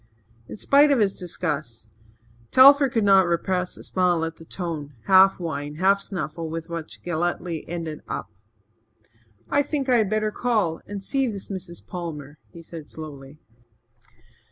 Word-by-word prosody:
In - - -8
spite 285 +7 +4
of 280 - +4
his 205 -4 +2
disgust, 140 - -4 0.6
Telford 275 +1 +7
could 225 -3 +1
not 195 -2 +5
repress 180 +1 -1
a - - -11
smile 175 -3 +1
at 165 0 -6
the 165 - -13
tone, 160 -5 -5
half 190 0 +6
whine, 150 -3 -4
half 195 +4 +3
snuffle, 165 -4 -4
with 165 +1 -6
which 165 -2 -7
Galletly 175 -1 -2
ended 165 -3 -5
up. - - -5 1.2
"I 285 - +4
think 280 -2 -2
I 245 - +5
had 215 -4 +2
better 215 0 0
call 210 -9 0
and 200 -1 -6
see 270 +5 0
this 200 -4 -5
Mrs. 185 -3 -7
Palmer," 155 -5 -7
he 170 -2 -12
said 160 -2 -10
slowly. 145 -2 -9
175 Hz, 155 wpm, -24 LUFS, 160-205 Hz, 1.2 s, Telford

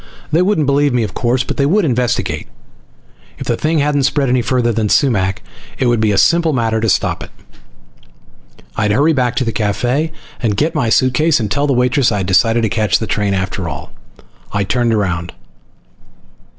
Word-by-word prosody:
They 160 +3 +3
wouldn't 180 -5 +1
believe 140 0 +2
me, 120 - +1
of 100 -4 -5
course, 125 +1 0
but - - -5
they 140 - +2
would 195 +4 +2
investigate. 125 - -1 0.9
If - - -7
the - - 0
thing 160 +1 0
hadn't 145 -1 +1
spread 135 0 +1
any 125 0 +2
farther 120 -1 0
than 110 -1 -1
Sumac 100 -9 +1 0.3
it 130 - 0
would 120 -2 +2
be 110 -1 +2
a 100 - 0
simple 165 +9 +3
matter 115 -3 0
to 115 - +1
stop - - 0
it. - - -8 1.5
I'd 105 -1 0
hurry 145 +8 +3
back 125 -4 0
to - - 0
the 115 - -1
cafe 125 +9 -1 0.3
and 105 -5 0
get 155 +7 0
my 140 -7 0
suitcase 130 +7 +2
and 105 -3 -3
tell 145 0 0
the 140 - +2
waitress 125 0 +2
I'd 100 -3 -1
decided 115 +5 +2
to - - +2
catch 105 -2 +1
the 110 - -4
train 105 -2 -1
after 95 -1 -3
all. 70 - -8 0.6
I 100 - 0
turned 120 +3 0
around. 90 -5 -1
120 Hz, 190 wpm, -16 LUFS, 105-140 Hz, 1.5 s, They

